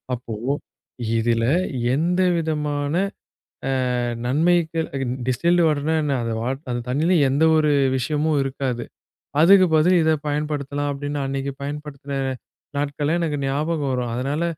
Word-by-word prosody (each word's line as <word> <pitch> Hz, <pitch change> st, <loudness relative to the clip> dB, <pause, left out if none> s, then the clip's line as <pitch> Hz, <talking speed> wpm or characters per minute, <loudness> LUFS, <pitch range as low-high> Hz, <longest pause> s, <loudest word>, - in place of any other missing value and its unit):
அப்போ, 115 Hz, -2 st, -7 dB, 0.8 s
இதுல 115 Hz, 0 st, +1 dB, 0.5 s
எந்த 175 Hz, +5 st, +1 dB, 0.2 s
விதமான 150 Hz, -3 st, -1 dB, 0.8 s
அ -, -, 0 dB, 0.6 s
நன்மைக 165 Hz, +4 st, +2 dB, 0.5 s
டிஹிஸ்ல்டு 170 Hz, +8 st, +2 dB
வாட்டர்ன்னா 150 Hz, +1 st, 0 dB
என்ன 145 Hz, -2 st, 0 dB
அந்த 115 Hz, -, -2 dB
வா 120 Hz, -, -1 dB, 0.4 s
தண்ணியில 160 Hz, +8 st, +2 dB, 0.2 s
எந்த 140 Hz, +4 st, +2 dB
ஒரு 155 Hz, -1 st, +3 dB, 0.3 s
விஷயமும் 150 Hz, +4 st, 0 dB
இருக்காது. 130 Hz, -3 st, -2 dB, 0.6 s
அதுக்கு 190 Hz, +3 st, +7 dB
பதிலா 175 Hz, +4 st, +4 dB
இதப் 155 Hz, -2 st, +1 dB
பயன்படுத்தலாம் 145 Hz, -1 st, -2 dB
அப்டின்னு 145 Hz, +1 st, -4 dB
அன்னைக்கு 135 Hz, +1 st, -2 dB
பயன்படுத்தின 145 Hz, -1 st, -6 dB, 0.6 s
நாட்கள்லாம் 145 Hz, +3 st, 0 dB
எனக்கு 155 Hz, -3 st, -1 dB
ஞாபகம் 145 Hz, 0 st, -1 dB
வரும். 125 Hz, -2 st, -2 dB
அதனால 140 Hz, +6 st, -1 dB
145 Hz, 115 wpm, -22 LUFS, 135-160 Hz, 0.8 s, அதுக்கு